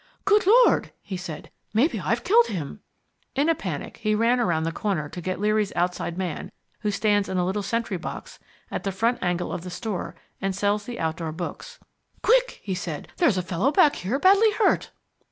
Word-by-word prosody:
"Good 410 Hz, -1 st, +4 dB
Lord," 480 Hz, +4 st, +5 dB
he 200 Hz, -, -5 dB
said. 180 Hz, -4 st, -7 dB, 0.2 s
"Maybe 265 Hz, +10 st, +3 dB
I've -, -, -1 dB
killed 465 Hz, +4 st, +5 dB
him!" 165 Hz, 0 st, -5 dB, 0.6 s
In 290 Hz, +4 st, +2 dB
a -, -, +5 dB
panic 180 Hz, -, -5 dB
he 215 Hz, 0 st, 0 dB
ran 235 Hz, +3 st, +3 dB
round 165 Hz, -7 st, +1 dB
the 165 Hz, -, -1 dB
corner 175 Hz, -5 st, -2 dB
to 175 Hz, -, -8 dB
get 185 Hz, +1 st, -3 dB
Leary's 210 Hz, 0 st, +1 dB
outside 175 Hz, 0 st, -1 dB
man, 185 Hz, -4 st, -4 dB, 0.3 s
who 210 Hz, -, -1 dB
stands 205 Hz, -1 st, +1 dB
in 190 Hz, -, -1 dB
a 180 Hz, -, +2 dB
little 195 Hz, +3 st, -1 dB
sentry 230 Hz, -2 st, -2 dB
box 175 Hz, -, -7 dB, 0.3 s
at -, -, -3 dB
the 195 Hz, -, -1 dB
front 230 Hz, +6 st, +1 dB
angle 175 Hz, 0 st, -1 dB
of -, -, -4 dB
the 180 Hz, -, -7 dB
store 195 Hz, +1 st, -4 dB, 0.3 s
and 195 Hz, -1 st, -1 dB
sells 205 Hz, +1 st, 0 dB
the 240 Hz, 0 st, -6 dB
outdoor 160 Hz, 0 st, -2 dB
books. 180 Hz, -, -6 dB, 0.5 s
"Quick," -, -, +3 dB
he 195 Hz, -, -2 dB
said. 175 Hz, -5 st, -5 dB
"There's 270 Hz, -, +3 dB
a 185 Hz, -, 0 dB
fellow 185 Hz, +10 st, 0 dB
back 295 Hz, -1 st, +4 dB
here 210 Hz, +9 st, -1 dB
badly 395 Hz, +7 st, +5 dB
hurt." 435 Hz, -1 st, +2 dB
200 Hz, 195 wpm, -25 LUFS, 180-245 Hz, 0.6 s, Lord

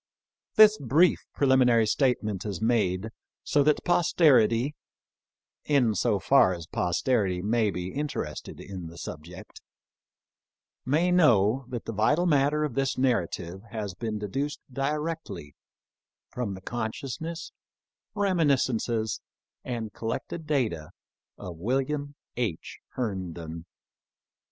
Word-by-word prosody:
This 215 Hz, -1 st, +7 dB
brief 150 Hz, +7 st, +3 dB, 0.2 s
preliminary 130 Hz, -4 st, +4 dB
statement 110 Hz, -5 st, 0 dB
is 100 Hz, -5 st, -4 dB
made 110 Hz, -3 st, +1 dB, 0.3 s
so 145 Hz, -, +2 dB
that 150 Hz, +1 st, +2 dB
posterity, 145 Hz, -7 st, +4 dB, 0.9 s
in 130 Hz, -7 st, +3 dB
so 105 Hz, +1 st, +1 dB
far 95 Hz, -4 st, +4 dB
as 85 Hz, -1 st, -8 dB
posterity 90 Hz, +2 st, 0 dB
may 110 Hz, 0 st, +2 dB
be 90 Hz, 0 st, -5 dB
interested 145 Hz, -, -4 dB
in 95 Hz, -4 st, -7 dB
the 85 Hz, +1 st, -11 dB
subject, 85 Hz, +4 st, -9 dB, 1.3 s
may 165 Hz, +7 st, +2 dB
know 125 Hz, -, +4 dB
that 120 Hz, -2 st, -5 dB
the 115 Hz, -, -4 dB
vital 145 Hz, -, +2 dB
matter 150 Hz, -1 st, +2 dB
of 150 Hz, -5 st, -2 dB
this 135 Hz, +1 st, 0 dB
narrative 95 Hz, -8 st, -1 dB
has 105 Hz, -3 st, -4 dB
been 110 Hz, +2 st, -4 dB
deduced 135 Hz, +9 st, -3 dB
directly 150 Hz, -, -3 dB, 0.8 s
from 115 Hz, -6 st, -3 dB
the 95 Hz, -, -11 dB
con 110 Hz, +2 st, -3 dB
sciousness, 160 Hz, +6 st, -6 dB, 0.6 s
reminiscences, 130 Hz, -, +1 dB, 0.4 s
and 115 Hz, -4 st, -4 dB
collected 150 Hz, +7 st, -5 dB
data 110 Hz, -, -1 dB, 0.5 s
of 85 Hz, -3 st, -8 dB
William 135 Hz, -, -2 dB, 0.2 s
H. 110 Hz, -10 st, -3 dB
Herndon. 85 Hz, -8 st, -4 dB
120 Hz, 110 wpm, -27 LUFS, 95-145 Hz, 1.3 s, This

